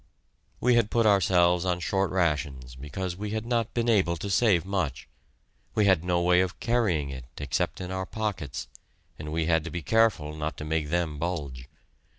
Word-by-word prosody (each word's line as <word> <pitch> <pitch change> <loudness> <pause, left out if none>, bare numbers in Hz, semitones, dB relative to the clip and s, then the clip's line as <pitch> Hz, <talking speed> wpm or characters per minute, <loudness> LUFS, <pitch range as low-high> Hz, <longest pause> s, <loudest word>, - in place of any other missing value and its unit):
We 125 +1 +3
had 115 -3 +3
put 115 -1 +2
ourselves 90 -3 +4
on 90 -1 0
short 95 +3 0
rations 75 -8 -1
because 75 +8 -5
we 105 +3 -5
had 110 - -4
not 115 -2 -1
been 120 -1 0
able 95 -7 +3
to 100 +4 -4
save 95 -4 +3
much; 90 -9 -2 0.7
we 105 - +3
had 95 -5 +4
no 90 -1 +1
way 90 +1 +4
of 90 -1 -3
carrying 100 - +1
it 65 -2 -8
except 70 -3 -2
in 90 0 -5
our 95 0 -3
pockets, 95 -11 -4 0.5
and 75 0 -6
we 80 0 0
had 80 -1 +2
to 85 - -5
be 85 -2 -5
careful 110 -10 +2
not 75 0 -4
to 75 - -6
make 80 -1 -1
them 80 -3 -1
bulge. 70 -7 -4
90 Hz, 185 wpm, -27 LUFS, 75-100 Hz, 0.7 s, ourselves